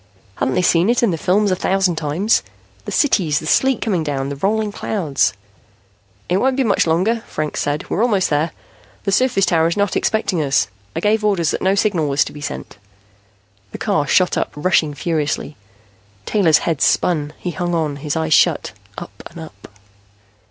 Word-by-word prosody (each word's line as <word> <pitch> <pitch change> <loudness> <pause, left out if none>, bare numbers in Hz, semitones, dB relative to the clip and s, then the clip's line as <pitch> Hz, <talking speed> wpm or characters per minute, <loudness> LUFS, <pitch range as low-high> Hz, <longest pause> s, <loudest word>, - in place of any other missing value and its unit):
Hadn't 130 - 0
they 180 - +1
seen 175 +3 +3
it 240 0 +2
in 225 - +3
the - - 0
films 200 +4 +2
a - - +2
thousand 190 -1 +1
times? 165 +8 +1 0.4
The - - -5
cities, 180 - +2
the 155 - -4
sleet 265 +10 +2
coming 190 -8 0
down, 140 -2 -2
the 140 - -4
rolling 210 +7 0
clouds 175 -9 -1 0.9
"It 180 - +1
won't 260 +5 +1
be 270 - +2
much 205 -6 +2
longer," 185 +9 +1
Franks 155 -1 -3
said. 145 +1 -2
"We're 205 - -1
almost 205 -8 +1
there. 150 +3 +1 0.5
The 195 - -1
surface 240 -2 +2
tower 165 -2 +2
is 170 - -2
not 205 -1 0
expecting 210 -6 0
us. 135 -7 +1 0.3
I - - -2
gave 215 +1 +1
orders 190 -6 +1
that - - -3
no 190 +1 +2
signal 195 -7 +1
was 140 +1 +2
to - - -8
be 145 - -10
sent." 105 - -7 0.9
The - - -5
car 145 -1 0
shot 185 +3 +2
up, - - -2
rushing 155 -1 +1
furiously. 150 -1 -2 0.7
Taylor's 175 -8 +3
head 160 -4 -1
spun; 150 -4 +1
he 180 - -4
hung 175 0 -2
on, 155 -3 -1
his 145 0 -3
eyes 160 -1 0
shut. - - +3 0.3
Up - - -9
and - - -12
up.... 105 -11 -11
175 Hz, 185 wpm, -19 LUFS, 150-200 Hz, 0.9 s, seen